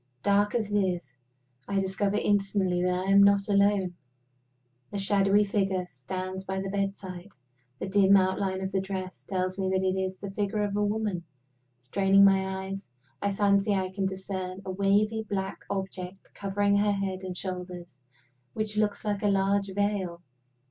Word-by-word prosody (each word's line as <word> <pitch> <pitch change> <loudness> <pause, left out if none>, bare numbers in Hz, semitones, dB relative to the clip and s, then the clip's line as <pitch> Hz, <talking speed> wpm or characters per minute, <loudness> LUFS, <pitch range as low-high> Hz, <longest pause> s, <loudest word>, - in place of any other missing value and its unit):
Dark 205 +1 +3
as 215 -3 -1
it 205 - +4
is, 180 -8 -1 0.5
I 200 -1 +1
discover 195 +1 0
instantly 195 -3 +1
that 180 +1 0
I 195 - +1
am 200 0 +7
not 200 0 +5
alone. 200 -2 +3 1.0
A 205 - -3
shadowy 200 +1 +3
figure 195 -2 0
stands 185 +7 -5
by 190 0 -3
my 195 0 -3
bedside. 195 -1 -3 0.5
The - - -4
dim 195 0 +5
outline 190 0 0
of 190 0 -3
the 190 -1 +1
dress 190 -1 -5
tells 185 0 -2
me 190 -1 0
that 190 0 +1
it 185 0 +1
is 190 0 -2
the 200 0 -6
figure 205 +1 -1
of 205 -1 -2
a 210 - +1
woman. 205 -4 -1 0.6
Straining 195 +9 +4
my 190 -1 +2
eyes, 195 +1 -6 0.3
I 200 - +1
fancy 200 0 +3
I 185 -1 -1
can 195 0 -1
discern 190 0 -5
a 190 - -3
wavy 200 +3 +2
black 195 -1 -2
object 190 -1 -5
covering 200 0 +1
her 205 0 +3
head 195 -2 -2
and 185 -1 -6
shoulders 180 -6 -6 0.5
which 215 -1 -3
looks 215 0 0
like 205 -1 -1
a 210 - +2
large 195 0 +2
veil. 190 -3 -1
195 Hz, 170 wpm, -28 LUFS, 190-200 Hz, 1.0 s, am